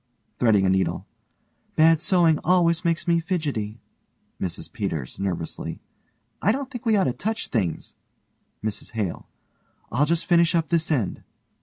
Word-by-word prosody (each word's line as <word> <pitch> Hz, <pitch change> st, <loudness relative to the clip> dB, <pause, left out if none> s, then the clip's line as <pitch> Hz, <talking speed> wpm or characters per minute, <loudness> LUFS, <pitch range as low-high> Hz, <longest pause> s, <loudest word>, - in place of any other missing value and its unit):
(threading 105 Hz, -5 st, +4 dB
a -, -, +3 dB
needle) 95 Hz, 0 st, 0 dB, 0.7 s
Bad 160 Hz, 0 st, +5 dB
sewing 170 Hz, -4 st, +3 dB
always 170 Hz, -1 st, +3 dB
made 170 Hz, 0 st, 0 dB
me 170 Hz, -1 st, +4 dB
fidgety. 145 Hz, -, -2 dB, 0.6 s
MRS 90 Hz, -3 st, -4 dB
PETERS: 80 Hz, -, -4 dB, 1.2 s
I 205 Hz, -, +4 dB
don't 270 Hz, +3 st, -3 dB
think 245 Hz, -2 st, -6 dB
we 220 Hz, -, +4 dB
ought 195 Hz, -, +3 dB
to 125 Hz, -, +1 dB
touch 220 Hz, -, -3 dB
things. 95 Hz, -9 st, -2 dB, 0.7 s
MRS 110 Hz, 0 st, -4 dB
HALE: 105 Hz, -6 st, -3 dB, 0.6 s
I'll 145 Hz, +5 st, +2 dB
just 170 Hz, +1 st, +1 dB
finish 170 Hz, -1 st, +4 dB
up 165 Hz, -1 st, +1 dB
this 165 Hz, -1 st, +1 dB
end. 125 Hz, -, 0 dB
160 Hz, 140 wpm, -24 LUFS, 110-175 Hz, 1.2 s, Bad